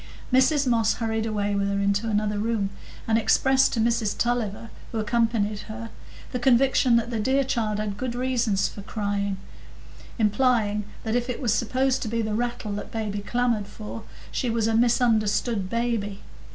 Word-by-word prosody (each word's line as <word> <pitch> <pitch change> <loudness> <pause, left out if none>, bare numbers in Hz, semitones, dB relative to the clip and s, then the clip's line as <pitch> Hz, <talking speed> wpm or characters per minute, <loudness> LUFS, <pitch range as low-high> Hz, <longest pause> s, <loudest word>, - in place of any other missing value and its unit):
Mrs 275 +3 +4
Moss 230 -3 +2
hurried 225 -1 -1
away 205 -2 -1
with 200 0 0
her 200 0 0
into 200 +3 +1
another 210 -1 0
room, 210 -3 0 0.4
and 225 0 +3
expressed 265 +4 +3
to 230 - -1
Mrs 230 -2 +1
Tulliver, 230 -2 -1 0.2
who 230 - -3
accompanied 220 -2 +1
her, 225 +1 -6 0.4
the 250 - -2
conviction 255 0 +4
that 235 +1 +1
the 230 - -1
dear 265 +5 +2
child 225 -5 -1
had 210 -2 -3
good 250 0 -3
reasons 240 -6 +1
for 200 - -9
crying; 200 -1 -2 0.8
implying 210 -2 +2 0.2
that 220 - -2
if 245 +1 0
it 250 - -3
was 235 -6 +1
supposed 255 +4 +1
to - - -3
be 230 +1 -1
the 215 -1 -2
rattle 235 -1 -2
that 205 0 -5
baby 215 -2 -3
clamored 230 -1 0
for, 110 - -8 0.3
she 250 - -1
was 225 -1 +1
a 225 - +1
misunderstood 225 -3 +2
baby. 230 -4 -2
225 Hz, 170 wpm, -25 LUFS, 205-240 Hz, 0.8 s, Mrs